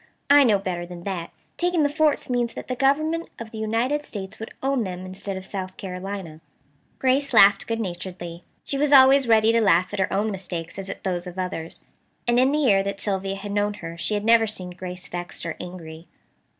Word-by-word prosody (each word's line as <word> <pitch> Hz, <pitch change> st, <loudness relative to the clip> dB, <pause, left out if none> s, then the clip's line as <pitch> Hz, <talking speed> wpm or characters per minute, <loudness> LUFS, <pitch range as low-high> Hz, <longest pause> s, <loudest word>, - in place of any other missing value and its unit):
"I 285 Hz, 0 st, +8 dB
know 220 Hz, -6 st, +4 dB
better 185 Hz, -3 st, -3 dB
than 175 Hz, 0 st, -9 dB
that. 180 Hz, -3 st, -4 dB, 0.3 s
Taking 350 Hz, -2 st, +2 dB
the -, -, +4 dB
forts 300 Hz, 0 st, +1 dB
means 245 Hz, -2 st, -1 dB
that -, -, -7 dB
the 255 Hz, -, -2 dB
Government 310 Hz, +6 st, +1 dB
of 230 Hz, -1 st, -8 dB
the 220 Hz, -, -7 dB
United 230 Hz, +7 st, 0 dB
States 195 Hz, -9 st, -7 dB
would 220 Hz, -, -7 dB
own 270 Hz, -3 st, +1 dB
them 185 Hz, -2 st, -5 dB
instead 190 Hz, +1 st, -4 dB
of 190 Hz, -, -7 dB
South 185 Hz, -1 st, -5 dB
Carolina." 185 Hz, -3 st, -6 dB, 0.6 s
Grace 265 Hz, +1 st, +1 dB
laughed 200 Hz, -1 st, +6 dB
good 230 Hz, 0 st, -1 dB
naturedly. 175 Hz, -3 st, -6 dB, 0.2 s
She 275 Hz, -, -3 dB
was 295 Hz, 0 st, +2 dB
always 270 Hz, 0 st, +7 dB
as -, -, -8 dB
ready 220 Hz, -1 st, +5 dB
to 230 Hz, 0 st, +3 dB
laugh 185 Hz, -2 st, +3 dB
at 205 Hz, -, -3 dB
her 190 Hz, -, +1 dB
own 210 Hz, +3 st, 0 dB
mistakes 180 Hz, -2 st, -6 dB
as 195 Hz, 0 st, -7 dB
at -, -, -7 dB
those 180 Hz, -1 st, -2 dB
of 180 Hz, +1 st, -9 dB
others; 180 Hz, -3 st, -4 dB, 0.5 s
and 240 Hz, +1 st, +4 dB
in 260 Hz, +2 st, +4 dB
the 295 Hz, -, +1 dB
year 225 Hz, -10 st, +4 dB
that 200 Hz, 0 st, -4 dB
Sylvia 195 Hz, -1 st, -2 dB
had 200 Hz, +1 st, -6 dB
known 205 Hz, 0 st, 0 dB
her 165 Hz, -3 st, -7 dB
she 190 Hz, +5 st, -2 dB
had 205 Hz, 0 st, -2 dB
never 230 Hz, 0 st, +5 dB
seen 185 Hz, -4 st, -6 dB
Grace 180 Hz, 0 st, -7 dB
vexed 175 Hz, -1 st, -6 dB
or 170 Hz, -, -3 dB
angry. 170 Hz, -2 st, -9 dB
200 Hz, 215 wpm, -24 LUFS, 180-240 Hz, 0.6 s, I